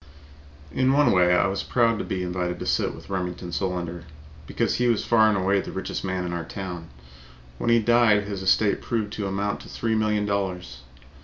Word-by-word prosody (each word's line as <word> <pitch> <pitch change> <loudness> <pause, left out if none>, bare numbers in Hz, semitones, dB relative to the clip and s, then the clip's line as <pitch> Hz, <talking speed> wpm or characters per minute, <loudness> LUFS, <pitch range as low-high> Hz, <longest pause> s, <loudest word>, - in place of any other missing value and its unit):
In 130 +1 +2
one 145 +1 +4
way 90 -1 +4
I 90 - +3
was 95 0 -1
proud 115 -2 +1
to - - -2
be 95 -1 -3
invited 90 0 -2
to - - -5
sit - - 0
with - - -12
Remington 90 -1 -4
Solander, 85 -2 -3 0.4
because - - -1
he 125 - +2
was 115 -3 +1
far 110 -2 +5
and 105 - +1
away 95 +1 +2
the - - -8
richest 95 - -4
man 95 -1 -2
in 85 - -4
our 85 -1 -3
town. 90 -4 -7 0.7
When - - -1
he 115 - +5
died, 115 -2 +4
his 100 -2 -5
estate 100 +2 +2
proved 110 -3 -2
to 105 -3 -3
amount 100 +1 -2
to - - -12
three 115 -1 -2
million 105 -1 +1
dollars. 90 -11 -3
100 Hz, 205 wpm, -25 LUFS, 90-110 Hz, 0.7 s, far